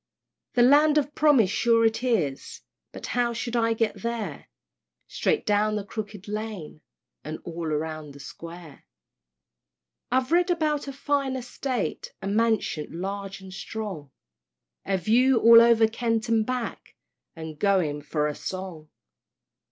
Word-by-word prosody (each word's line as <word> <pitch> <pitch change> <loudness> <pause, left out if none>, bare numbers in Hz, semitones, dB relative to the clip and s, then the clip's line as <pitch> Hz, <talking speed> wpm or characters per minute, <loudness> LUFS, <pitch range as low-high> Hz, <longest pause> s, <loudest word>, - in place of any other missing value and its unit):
The 245 - +4
Land 295 +4 +5
of 295 0 0
Promise 275 -12 +4
sure 230 0 +3
it 225 0 +1
is! 170 - -1 0.3
But - - -8
how 240 -1 +1
shall 235 +1 -4
I 230 0 +2
get 225 -1 -1
there? 235 -2 -4 0.6
"Straight 450 - -1
down 210 0 +2
the 210 - -2
Crooked 205 -1 -7
Lane, 210 -7 -6 0.4
And 155 +1 -5
all 170 -1 -5
round 155 -1 -3
the - - -12
Square." 165 +1 -11 1.3
I've 255 +2 +1
read 350 +1 +3
about 305 -4 0
a - - -3
fine 275 -1 -1
Estate, 250 -2 -4
A - - -6
Mansion 210 -7 0
large 195 +1 -5
and 190 -1 -11
strong; 195 -7 -6 0.8
A 195 -1 +1
view 240 +8 +3
all 230 0 +9
over 230 -1 +5
Kent 225 0 -1
and 225 -1 +2
back, 250 -2 -4 0.4
And 160 -2 -8
going 180 -8 +1
for 150 +1 -1
a 150 - -1
song. 180 -3 -7
220 Hz, 140 wpm, -26 LUFS, 175-245 Hz, 1.3 s, all